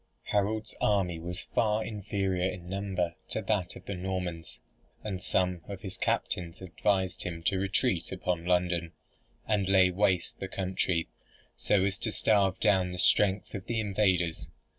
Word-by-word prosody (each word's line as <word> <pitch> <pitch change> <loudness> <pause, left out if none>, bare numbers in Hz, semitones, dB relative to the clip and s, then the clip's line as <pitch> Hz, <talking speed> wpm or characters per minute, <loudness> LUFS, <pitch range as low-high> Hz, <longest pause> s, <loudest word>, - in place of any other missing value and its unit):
Harold's 110 +2 0
army 95 -5 +2
was 90 +2 -5
far 110 0 +2
inferior 95 -3 -1
in 90 -2 -7
number 95 -3 -1 0.2
to - - -1
that 100 -3 -1
of - - -11
the 100 - -3
Normans, 90 -3 -4 0.4
and 95 -4 -3
some 90 -3 +1
of 100 -2 -6
his 95 -2 -6
captains 90 -1 -1
advised 95 +1 0
him 85 -2 -5
to 95 +2 +1
retreat 95 -1 0
upon 90 -2 -1
London, 90 -1 +1 0.5
and 100 -3 +1
lay 95 -1 +6
waste 95 -2 +1
the 95 - -3
country, 90 -3 -1 0.5
so 95 -2 +2
as 100 +1 -1
to 110 - -1
starve 100 -4 +2
down 95 -2 +3
the 90 - -5
strength, 100 +2 +3
of 95 -2 -6
the 115 -1 0
invaders. 95 -6 +1
95 Hz, 155 wpm, -30 LUFS, 90-100 Hz, 0.5 s, lay